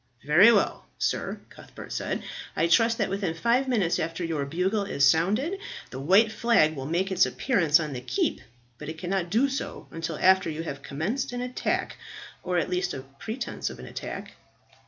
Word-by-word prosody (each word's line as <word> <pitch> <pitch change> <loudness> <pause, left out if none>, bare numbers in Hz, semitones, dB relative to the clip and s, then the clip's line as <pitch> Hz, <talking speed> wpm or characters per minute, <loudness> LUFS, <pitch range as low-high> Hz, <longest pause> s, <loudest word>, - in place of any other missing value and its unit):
"Very 175 +10 +7
well, 205 -4 +1
sir," - - -1
Cuthbert - - -11
said. - - -3 0.3
"I 165 - +2
trust 225 +7 +4
that 200 -4 -1
within 195 -4 -1
five 235 +9 +2
minutes 205 -9 +1
after 165 +2 -2
your 155 -4 -2
bugle 190 +7 0
has 140 -8 +2
sounded, 215 - +2 0.3
the 130 - -6
white 195 +10 +4
flag 220 -9 +3
will 135 -1 -5
make 180 +5 0
its 185 0 +4
appearance 170 - +2
on 155 -3 -3
the 125 - -5
keep, 125 0 -1 0.4
but 150 - -7
it 160 - -6
cannot 180 +1 -2
do 235 +9 +3
so 270 0 -5
until 165 -1 -4
after 190 -2 +4
you 160 +1 -4
have 140 -4 -6
commenced 215 - -3
an 245 - -3
attack, 250 0 -2 0.4
or 180 -1 -1
at 170 - +1
least 180 0 -1
a 130 0 -7
pretence 235 +3 -4
of - - -9
an - - -10
attack." - - -7
180 Hz, 185 wpm, -27 LUFS, 160-220 Hz, 0.4 s, Very